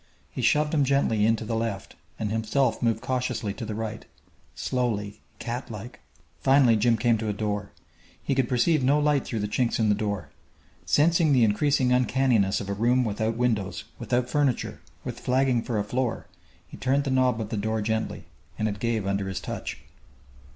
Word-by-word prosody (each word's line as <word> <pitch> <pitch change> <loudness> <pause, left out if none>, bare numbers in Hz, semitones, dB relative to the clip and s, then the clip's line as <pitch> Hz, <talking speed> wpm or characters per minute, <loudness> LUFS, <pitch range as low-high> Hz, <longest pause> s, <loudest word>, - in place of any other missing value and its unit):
He - - -4
shoved 150 +1 +2
him 145 -3 +3
gently 130 -6 +2
in 115 - +4
to 110 - -6
the 115 +1 -2
left 110 -4 -3 0.2
and 105 -1 -2
himself 115 +5 0
moved 115 -2 +1
cautiously 125 -5 -2
to 115 - -6
the 105 -1 -4
right, 110 0 -4 0.5
slowly, 110 -5 -2 0.2
catlike. 120 -1 -6 0.4
Finally, 130 -4 +5
Jim 115 +2 +3
came 115 0 +2
to 110 - -3
a 105 - 0
door. 105 0 -3 0.5
He - - 0
could 130 -3 +1
perceive 135 +4 +2
no 140 +3 +4
light 150 -2 +2
through 115 -3 -3
the 105 - -1
chinks 115 +3 0
in 110 -2 +2
the - - +5
door. 100 -1 -3 0.6
Sensing 160 0 +4
the 125 -3 +5
increasing 130 +4 +2
uncanniness 125 -5 +2
of 100 - -6
a 100 - -1
room 120 +5 +2
without 110 0 -1
windows, 110 -6 0 0.2
without 125 0 0
furniture, 140 -1 0 0.2
with - - -6
flagging 130 -1 +2
for 115 -1 -3
a 105 - +1
floor, 125 +3 -2 0.4
he - - -11
turned 135 +2 +1
the 140 - -2
knob 130 -3 +2
of 110 -2 -4
the - - -3
door 110 +2 -1
gently, 110 +1 -2 0.3
and 110 - 0
it 100 -1 -4
gave 115 -3 -1
under 100 0 -1
his 95 -1 -3
touch. - - -5
115 Hz, 185 wpm, -26 LUFS, 105-130 Hz, 0.6 s, Finally